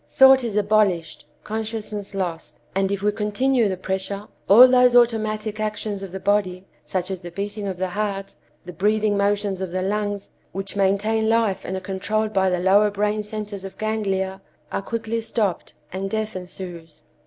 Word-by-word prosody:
Thought 265 -1 +7
is 225 -4 -3
abolished, 200 -7 +1 0.2
consciousness 215 -2 -4
lost. 175 -4 -4
And 195 0 +1
if 200 0 -2
we 210 - +3
continue 220 +3 +1
the 190 - -2
pressure, 190 +2 -3 0.2
all 235 +6 +10
those 250 -1 +5
automatic 215 -2 +2
actions 210 -1 -3
of 195 -2 -7
the 190 - -5
body, 190 -2 0 0.2
such 185 0 -3
as 185 -2 -4
the 175 - -7
beating 200 +3 -4
of 190 -2 -3
the 185 0 -1
heart, 200 0 -3 0.3
the 180 - -8
breathing 210 +4 +1
motions 200 -1 0
of 190 - -2
the 185 +1 -2
lungs, 205 0 -2 0.2
which 195 +2 -4
maintain 205 +3 +2
life 225 -4 +1
and 190 - -3
are - - -5
controlled 210 +3 -2
by 190 -1 +3
the 180 - +1
lower 200 +3 +4
brain 210 +1 0
centers 210 -2 -6
of 195 - -9
ganglia, 195 -3 -1 0.3
are - - -1
quickly 225 +2 -3
stopped 210 -5 -2 0.2
and 195 +1 -3
death 215 0 -2
ensues. 180 -3 -8
205 Hz, 175 wpm, -23 LUFS, 190-215 Hz, 0.3 s, all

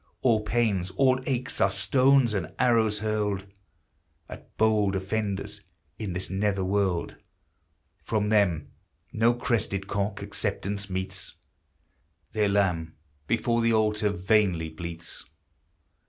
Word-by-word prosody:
All 115 -4 +4
pains, 105 -5 0
all 130 -1 +4
aches, 130 -1 -2
are 100 - +5
stones 130 +5 +3
and 95 -5 -3
arrows 115 -4 +3
hurled 105 -3 -1 0.8
At - - -12
bold 105 -3 +3
offenders 100 +1 -3 0.4
in 105 -5 -3
this 90 +1 -4
nether 100 0 0
world! 95 -2 0 0.9
From 105 -2 0
them 100 -8 +2 0.4
no 115 +2 +3
crested 110 -5 -1
cock 100 0 -2
acceptance 100 +2 -2
meets! 95 0 -4 1.0
Their 105 -2 +1
lamb 90 -5 0 0.3
before 115 +1 +1
the 115 0 +3
altar 105 -1 +2
vainly 95 -3 +1
bleats! 85 +1 -5
105 Hz, 110 wpm, -27 LUFS, 95-110 Hz, 1.0 s, are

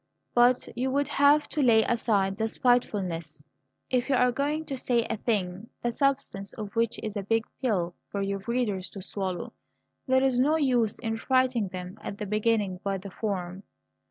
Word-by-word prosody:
But 245 +1 +4
you 255 +2 0
would 280 +1 +1
have 290 +1 +4
to 300 - -1
lay 230 -4 +5
aside 205 -5 +1
the 220 0 0
spitefulness. 180 - 0 0.4
If 250 +1 +1
you 275 - +4
are 250 0 +4
going 295 +5 -1
to 275 - -4
say 240 -2 +1
a 225 - -2
thing 200 -2 -2
the 240 - +1
substance 265 -7 -1
of 210 -1 -7
which 230 -1 +1
is 215 -1 -4
a 205 - -1
big 225 +3 0 0.2
pill 185 -9 0 0.2
for 200 -1 -2
your 195 0 -2
readers 225 -6 -1
to - - -5
swallow, 190 -2 -4 0.5
there 260 0 +4
is 260 -2 +2
no 295 +5 +4
use 245 -8 +2
in 225 -2 -3
frightening 255 -3 +2
them 180 0 -7
at 200 - -6
the 210 - -4
beginning 210 -2 0
by 195 -1 -1
the 190 +1 -9
form." 190 -3 -3
225 Hz, 185 wpm, -27 LUFS, 195-255 Hz, 0.5 s, lay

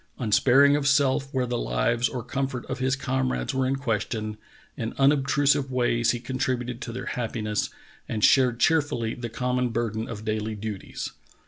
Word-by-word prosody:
Unsparing 135 +5 +5
of 145 -1 0
self 140 -1 +2
where 130 -2 0
the 120 0 -2
lives - - +1
or 125 -3 -5
comfort 130 0 -3
of 130 - -5
his 130 0 +1
comrades 130 0 -1
were 130 -1 +1
in 135 - +1
question, 110 -4 -2 0.4
in 115 - -4
unobtrusive 140 0 +3
v/ays 120 -2 +1
he 120 - +1
contributed 125 -1 -2
to 115 - -5
their 125 - -6
happiness 110 -3 -2 0.4
and 105 -2 -2
shared 125 -3 +4
cheerfully 145 -9 +2
the 120 -1 -6
common 125 +2 -1
burden 115 -1 -2
of 110 -2 -7
daily 110 0 -2
duties. 105 -2 -5
125 Hz, 160 wpm, -26 LUFS, 115-135 Hz, 0.4 s, Unsparing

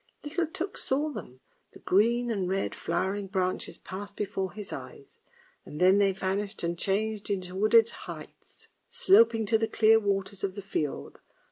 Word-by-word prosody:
" - - -43
Little 330 +3 -1
Tuk 360 +5 -4
saw 290 +4 0
them, 130 - -9 0.3
the - - -13
green 235 +5 +2
and 190 -5 -1
red 195 +1 -1
flowering 195 +1 -2
branches 185 -1 -2
passed 200 +2 -8
before 190 -2 -3
his 205 -1 -7
eyes; 430 -4 -10 0.4
and 150 - -9
then 185 +2 +5
they 200 -1 +4
vanished 195 +2 -3
and 170 0 -1
changed 205 +4 -1
into 185 -3 -3
wooded 215 +3 +4
heights, - - -11 0.2
sloping 230 - +4
to 220 +2 +2
the 225 - +1
clear 225 0 +5
waters 200 -2 -2
of 195 -1 -2
the 200 - -7
fiord. 155 -7 -4
200 Hz, 165 wpm, -28 LUFS, 190-225 Hz, 0.4 s, then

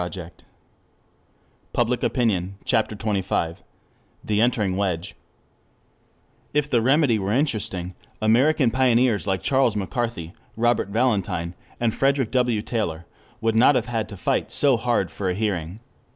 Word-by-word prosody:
THE 90 -1 -6 1.4
APPEAL - - +3
TO - - 0
REASON 100 -6 0
CHAPTER 110 -1 +1
XXV 95 -6 -1 0.7
THE 105 0 0
ENTERING 110 -6 +1
WEDGE 90 -3 -2
1 - - -33 1.4
If 150 -1 +2
the 120 -5 +2
remedy 135 -2 +3
were 95 +1 -2
interesting, 110 - -1 0.3
American 125 +4 +3
pioneers 125 -4 +2
like 95 -1 -1
Charles 130 -5 +2
McCarthy, 105 -4 -3 0.2
Robert 120 -3 +2
Valentine, 100 -6 0 0.3
and 115 -2 +1
Frederick 135 -3 +1
W. 125 -5 +1
Taylor 85 -10 -3 0.4
would 115 0 +1
not 125 +5 +5
have 120 - +1
had 115 -3 -3
to 100 - -9
fight - - -1
so 140 -3 +3
hard 120 +1 0
for 95 -2 -3
a 90 - -1
hearing. 95 -2 -3
110 Hz, 135 wpm, -23 LUFS, 95-125 Hz, 1.4 s, not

